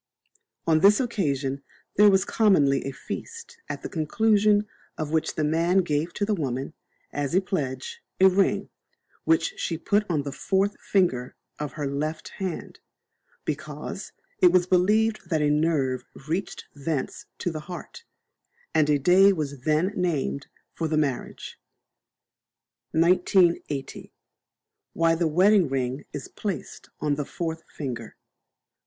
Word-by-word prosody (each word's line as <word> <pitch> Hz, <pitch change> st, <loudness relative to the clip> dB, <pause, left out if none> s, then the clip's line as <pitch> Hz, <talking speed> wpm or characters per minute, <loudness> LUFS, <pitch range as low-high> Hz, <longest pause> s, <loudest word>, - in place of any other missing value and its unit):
On 160 Hz, -1 st, +4 dB
this 200 Hz, +4 st, +6 dB
occasion 140 Hz, -, -1 dB, 0.3 s
there 210 Hz, +1 st, +7 dB
was 190 Hz, -1 st, +3 dB
commonly 150 Hz, -11 st, +3 dB
a 135 Hz, -, -2 dB
feast, 465 Hz, -, -8 dB
at -, -, -5 dB
the -, -, -3 dB
conclusion 210 Hz, +5 st, +2 dB, 0.3 s
of 155 Hz, -1 st, -3 dB
which 160 Hz, -1 st, 0 dB
the 155 Hz, -, 0 dB
man 170 Hz, +5 st, +2 dB
gave 155 Hz, +1 st, -1 dB
to 205 Hz, -, 0 dB
the 215 Hz, -, 0 dB
woman, 135 Hz, -4 st, -3 dB, 0.4 s
as 145 Hz, +2 st, -1 dB
a -, -, +6 dB
pledge, 135 Hz, -9 st, -4 dB, 0.2 s
a 190 Hz, -, +8 dB
ring, 190 Hz, +1 st, +2 dB, 0.5 s
which 330 Hz, +4 st, +2 dB
she 170 Hz, -, -2 dB
put 205 Hz, +5 st, +1 dB
on 155 Hz, -4 st, 0 dB
the 140 Hz, -, -4 dB
fourth 195 Hz, +6 st, 0 dB
finger 150 Hz, -11 st, +1 dB, 0.2 s
of 150 Hz, -1 st, -4 dB
her 150 Hz, -3 st, -4 dB
left 150 Hz, +3 st, -3 dB
hand, 190 Hz, -3 st, -5 dB, 0.7 s
because -, -, -5 dB, 0.3 s
it 180 Hz, -, +7 dB
was 180 Hz, -1 st, +4 dB
believed 210 Hz, +5 st, +2 dB
that 160 Hz, -4 st, +1 dB
a 145 Hz, -, +3 dB
nerve 145 Hz, -5 st, +1 dB, 0.2 s
reached 175 Hz, +5 st, -3 dB
thence 145 Hz, -1 st, -4 dB
to 175 Hz, -, -2 dB
the 155 Hz, -, -5 dB
heart, 180 Hz, -, -8 dB, 0.7 s
and 155 Hz, -1 st, +3 dB
a 150 Hz, -, +4 dB
day 185 Hz, +7 st, +6 dB
was 145 Hz, -7 st, -4 dB
then 155 Hz, +6 st, +2 dB
named 155 Hz, -6 st, -1 dB, 0.3 s
for 165 Hz, -, -2 dB
the 155 Hz, 0 st, 0 dB
marriage. 140 Hz, -5 st, -3 dB, 1.3 s
1980. 170 Hz, -3 st, +2 dB, 0.8 s
Why 165 Hz, 0 st, +3 dB
the 165 Hz, 0 st, +1 dB
Wedding 185 Hz, +1 st, +4 dB
Ring 130 Hz, +1 st, -2 dB
is 135 Hz, -, -6 dB
placed 200 Hz, -5 st, -6 dB
on 150 Hz, -1 st, +1 dB
the 145 Hz, +1 st, -1 dB
Fourth 165 Hz, +1 st, -4 dB
Finger. 125 Hz, -6 st, -6 dB
165 Hz, 140 wpm, -26 LUFS, 145-190 Hz, 1.3 s, a